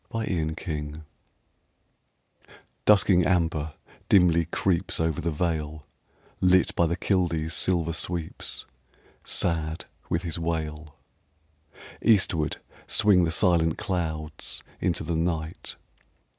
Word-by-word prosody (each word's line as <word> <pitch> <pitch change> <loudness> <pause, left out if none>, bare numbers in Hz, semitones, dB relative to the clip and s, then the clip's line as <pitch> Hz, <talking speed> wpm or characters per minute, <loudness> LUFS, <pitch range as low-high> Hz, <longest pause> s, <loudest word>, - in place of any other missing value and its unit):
STORM 115 -1 -2 0.3
EBB 75 -2 -5 1.8
Dusking 95 -3 +5
amber 80 -4 0 0.3
dimly 85 -4 +5
creeps 90 +1 0
Over 80 0 0
the 85 - -1
vale, 80 -2 -2 0.5
Lit 90 -1 +4
by 85 - +3
the 85 - 0
kildee's 85 -5 0
silver 85 -3 +1
sweeps, 85 0 -3 0.6
Sad 80 -2 0 0.2
with 85 - 0
his 85 -1 -3
wail. 80 -3 -3 1.1
Eastward 95 -8 +2 0.3
swing 100 -5 +4
the - - 0
silent 85 -3 +3
clouds 80 -6 -4 0.2
Into 85 - 0
the 85 +1 -2
night. 80 -1 -2
85 Hz, 100 wpm, -26 LUFS, 80-90 Hz, 1.8 s, Dusking